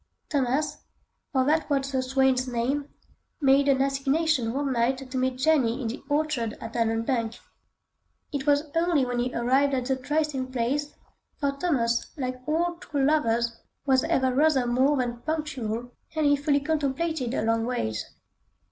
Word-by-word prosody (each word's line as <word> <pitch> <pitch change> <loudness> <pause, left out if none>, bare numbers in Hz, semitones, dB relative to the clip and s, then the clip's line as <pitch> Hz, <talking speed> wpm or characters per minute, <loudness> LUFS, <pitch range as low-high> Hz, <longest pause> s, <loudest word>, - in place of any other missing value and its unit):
Thomas, 280 +2 0 0.5
for 260 -2 +2
that 310 +2 +1
was 275 -1 0
the 260 -1 +1
swain's 260 0 +2
name, 255 +4 -1 0.5
made 275 -1 +4
an 270 -1 +4
assignation 275 -1 +1
one 275 +1 -1
night 240 +2 +1
to - - -6
meet 255 0 0
Jenny 260 -4 +2
in 240 -4 -2
the 245 - -6
orchard 290 -7 0
at 225 0 -7
Allanbank. 230 0 0 1.0
It 285 0 -3
was 290 +1 +2
early 330 -5 +2
when 245 -1 -2
he 250 +1 0
arrived 265 +4 +2
at 255 -1 -1
the 265 +1 +1
trysting 270 -1 -1
place—for 280 +2 -3
Thomas, 270 -6 0
like 255 -2 -3
all 340 +3 0
true 285 -4 -1
lovers, 235 -6 +1 0.3
was 265 -1 +3
ever 265 -6 +1
rather 280 -2 +3
more 260 +4 +2
than 240 -2 -1
punctual—and 275 -1 -3
he 285 0 +5
fully 285 0 +1
contemplated 295 -2 -1
a - - 0
long 225 +1 +1
wait. 110 - -2
265 Hz, 150 wpm, -26 LUFS, 245-290 Hz, 1.0 s, he